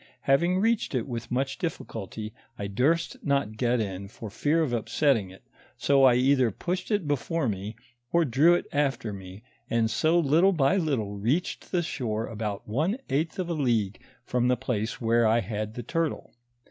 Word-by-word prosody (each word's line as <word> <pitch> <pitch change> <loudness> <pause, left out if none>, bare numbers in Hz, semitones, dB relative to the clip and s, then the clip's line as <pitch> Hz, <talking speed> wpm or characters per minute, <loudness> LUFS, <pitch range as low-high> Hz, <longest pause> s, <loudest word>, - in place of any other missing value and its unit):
Having 170 +7 +3
reached 225 - +1
it 125 +1 -1
with 120 -2 -5
much 130 +2 -1
difficulty, 110 - -5 0.2
I 100 - -4
duret 140 +12 +1
not 140 -7 0
get 120 +1 +1
in 100 -2 -3
for 105 +1 -9
fear 150 +8 +1
of 135 -6 -2
upsetting 115 -2 +1
it, 95 - -15 0.3
so 140 -1 +4
I 125 -2 +6
either 130 -1 +3
pushed 180 - -4
it 205 -7 0
before 145 +2 0
me, 105 +1 -3 0.4
or 170 -1 +3
drew 145 +7 +5
it - - -2
after 140 -8 0
me, 95 +2 -10 0.3
and 115 -1 +1
so 160 +8 +2
little 170 +5 +4
by 155 +2 +3
little 135 - 0
reached 120 - -2
the 175 -2 +1
shore 115 -8 -2
about 105 -2 -5
one 155 - 0
eighth 155 +4 0
of 185 -2 -2
a 170 - -1
league 115 -9 0 0.2
from 125 0 +1
the 125 0 +3
place 115 -3 -2
where 115 0 +3
I 115 +2 +4
had 110 -1 -4
the 120 - -5
turtle. 165 +5 -2
125 Hz, 180 wpm, -27 LUFS, 110-160 Hz, 0.4 s, I